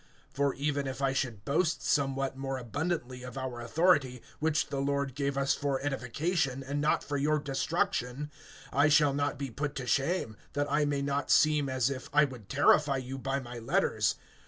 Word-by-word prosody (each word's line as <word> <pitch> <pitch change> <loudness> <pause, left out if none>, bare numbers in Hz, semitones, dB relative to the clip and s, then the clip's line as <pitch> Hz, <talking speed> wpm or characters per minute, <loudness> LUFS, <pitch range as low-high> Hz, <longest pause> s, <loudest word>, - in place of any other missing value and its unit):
(8)For 140 -1 +1
even 140 0 -1
if 130 0 -5
I 135 -1 +1
should 120 -7 -2
boast 155 +3 +1
somewhat 135 -2 0
more 135 0 -3
abundantly 130 +1 -3
of 125 +1 -8
our 130 -2 -4
authority, 135 -2 +2 0.2
which 155 0 +1
the 140 -1 -2
Lord 140 -1 -1
gave 140 0 -2
us 140 0 +2
for 140 -2 -1
edification, 135 +1 -1
and 140 +2 -2
not 150 - +2
for 145 0 -2
your 150 +2 +2
destruction[10:8], 145 -1 -1 0.4
I 145 +2 +4
shall 150 -2 +5
not 145 0 -1
be 135 -2 -4
put 145 +4 -3
to 130 - -4
shame; 135 -2 0 0.2
(9)that 145 0 +1
I 150 +1 +3
may 140 -1 0
not 140 0 -1
seem 150 -3 +4
as 130 0 +1
if 130 -1 -6
I 150 +1 +5
would 125 -8 -10
terrify 145 0 +4
you 130 +1 -5
by 135 +1 -1
my 120 -2 -8
letters. 115 - +1
140 Hz, 185 wpm, -30 LUFS, 130-145 Hz, 0.4 s, shall